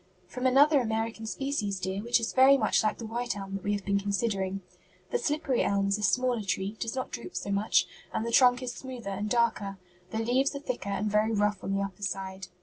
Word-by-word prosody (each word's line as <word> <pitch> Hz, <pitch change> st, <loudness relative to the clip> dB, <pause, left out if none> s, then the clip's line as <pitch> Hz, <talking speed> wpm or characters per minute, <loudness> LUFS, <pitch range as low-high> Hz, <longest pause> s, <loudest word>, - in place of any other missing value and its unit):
"From 250 Hz, +1 st, -1 dB
another 280 Hz, +2 st, +5 dB
American 225 Hz, -1 st, -2 dB
species, 220 Hz, -7 st, -2 dB
dear, 190 Hz, +1 st, -3 dB
which 235 Hz, +2 st, +2 dB
is 225 Hz, -, -3 dB
very 265 Hz, +1 st, +7 dB
much -, -, +2 dB
like 215 Hz, -2 st, 0 dB
the 230 Hz, -, -7 dB
white 235 Hz, -1 st, -3 dB
elm 195 Hz, -1 st, -7 dB
that 195 Hz, -, -4 dB
we 205 Hz, -, 0 dB
have 200 Hz, -1 st, -3 dB
been 200 Hz, 0 st, +2 dB
considering. 195 Hz, -1 st, -1 dB, 0.5 s
The 480 Hz, -, +1 dB
slippery 295 Hz, -, 0 dB
elm 200 Hz, 0 st, +1 dB
is 200 Hz, +1 st, +1 dB
a -, -, -5 dB
smaller 245 Hz, +2 st, +2 dB
tree, 195 Hz, +1 st, -2 dB
does 230 Hz, 0 st, -3 dB
not 260 Hz, -, -3 dB
droop -, -, -7 dB
so 200 Hz, -, -3 dB
much, 200 Hz, +2 st, +3 dB, 0.3 s
and 220 Hz, -, -2 dB
the 235 Hz, -, -2 dB
trunk 250 Hz, +1 st, +5 dB
is 245 Hz, -1 st, -3 dB
smoother 250 Hz, -6 st, -7 dB
and 205 Hz, +2 st, -3 dB
darker. 220 Hz, -4 st, +1 dB, 0.3 s
The 220 Hz, -, -4 dB
leaves 255 Hz, +5 st, +1 dB
are -, -, -3 dB
thicker 250 Hz, -7 st, -4 dB
and 195 Hz, +1 st, -1 dB
very 210 Hz, +2 st, +2 dB
rough 205 Hz, -1 st, +1 dB
on 195 Hz, -, -1 dB
the 200 Hz, -, 0 dB
upper 195 Hz, 0 st, -7 dB
side. 190 Hz, -1 st, -4 dB
220 Hz, 230 wpm, -29 LUFS, 200-250 Hz, 0.5 s, very